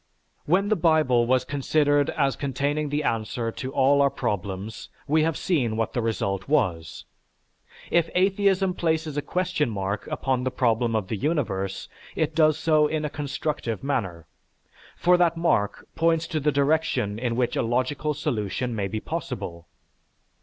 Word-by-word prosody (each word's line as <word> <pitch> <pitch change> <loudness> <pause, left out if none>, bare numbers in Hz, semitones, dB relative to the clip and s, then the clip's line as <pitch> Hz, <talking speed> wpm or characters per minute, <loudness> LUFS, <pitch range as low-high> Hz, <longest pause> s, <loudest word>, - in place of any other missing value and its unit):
When 195 +6 +2
the 215 - +3
Bible 155 - +3
was 130 0 +2
considered 145 0 +2
as 140 -3 0
containing 145 +2 -1
the 145 +1 -1
answer 115 -1 -1
to 130 +3 -6
all 140 +1 +4
our 140 - +4
problems 105 -3 -4 0.2
we 155 +2 +3
have 160 0 0
seen 125 - 0
what 115 -1 -1
the 120 - 0
result 100 -4 -2
was. 95 - 0 0.9
If 170 -1 +3
atheism 195 0 +2
places 160 -3 -1
a 145 - 0
question 180 -2 -1
mark 100 -1 -3
upon 130 -2 -1
the 130 - 0
problem 120 -2 +1
of 105 -4 -1
the 110 - -3
universe, 100 - -2 0.3
it 155 0 0
does 155 -1 +4
so 155 -2 +3
in 155 0 -2
a 150 - -3
constructive 145 -5 -3
manner; 95 - -2 0.7
for 180 +1 +4
that 170 -2 +2
mark 115 -12 0
points 165 0 +2
to 160 -4 -1
the 150 +1 +1
direction 140 -7 +1
in 120 -1 -1
which 125 -1 0
a - - +1
logical 130 +6 -1
solution 120 -2 -2
may 100 -2 -1
be 110 +3 -3
possible. 85 -5 -5
140 Hz, 160 wpm, -25 LUFS, 115-155 Hz, 0.9 s, all